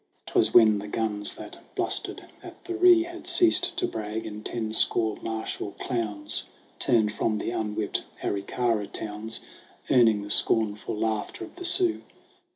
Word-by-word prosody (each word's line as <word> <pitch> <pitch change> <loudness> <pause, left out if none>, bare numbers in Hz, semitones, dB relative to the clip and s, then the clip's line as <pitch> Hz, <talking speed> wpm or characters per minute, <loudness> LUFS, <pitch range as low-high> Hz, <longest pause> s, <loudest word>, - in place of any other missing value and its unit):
'TwAS - - +2
when 110 -3 +6
the 105 - -7
guns 105 -1 -2
that - - -10 0.2
blustered - - -2 0.2
at - - -12
the 355 - -4
Ree 355 -1 +6
Had 345 +1 -10
ceased 350 -1 +4
to 365 - +1
brag, 110 - -4
and 105 0 -7
ten 110 -1 -3
score 110 -1 +2
martial 110 -2 -4
clowns 105 -5 -3 0.3
Turned 110 -3 +2
from 110 -1 0
the 115 - -3
unwhipped 105 -2 -2 0.2
Aricara 105 +1 -1
towns, 110 +1 -5 0.5
Earning 110 -5 +5
the 100 - -6
scornful 110 -1 +2
laughter 110 - -2
of 335 - -16
the 360 - -6
Sioux. 350 -1 +2
110 Hz, 150 wpm, -26 LUFS, 105-125 Hz, 0.5 s, when